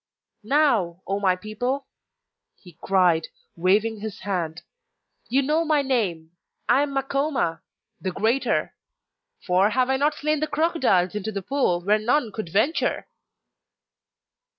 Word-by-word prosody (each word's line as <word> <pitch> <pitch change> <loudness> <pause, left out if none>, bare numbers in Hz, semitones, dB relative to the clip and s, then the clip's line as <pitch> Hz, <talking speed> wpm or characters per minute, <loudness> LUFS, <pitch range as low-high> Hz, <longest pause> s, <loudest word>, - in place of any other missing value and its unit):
'Now, 215 - +1
O 195 +1 -1
my 190 -2 +2
people!' 245 +8 -3 0.7
he 175 -3 -16
cried, 180 -4 +2 0.3
waving 205 +5 +1
his 215 -1 -7
hand, 175 -5 -3 0.7
'you 270 +4 +2
know 305 +4 +1
my 305 -3 +2
name 190 -12 -1 0.4
I 275 - +4
am 285 -1 -2
Makoma, 270 - -1 0.4
"the 190 - -2
Greater"; 225 +8 0 0.7
for 185 +3 +3
have 255 +3 +1
I 265 - +2
not 290 +2 +1
slain 305 0 0
the 310 - -1
crocodiles 290 - +1
into 210 +1 -3
the 195 -2 -5
pool 220 -8 0
where 210 +4 +2
none 240 +2 +1
would 215 -6 -5
venture? 220 - 0
220 Hz, 130 wpm, -24 LUFS, 185-275 Hz, 0.7 s, I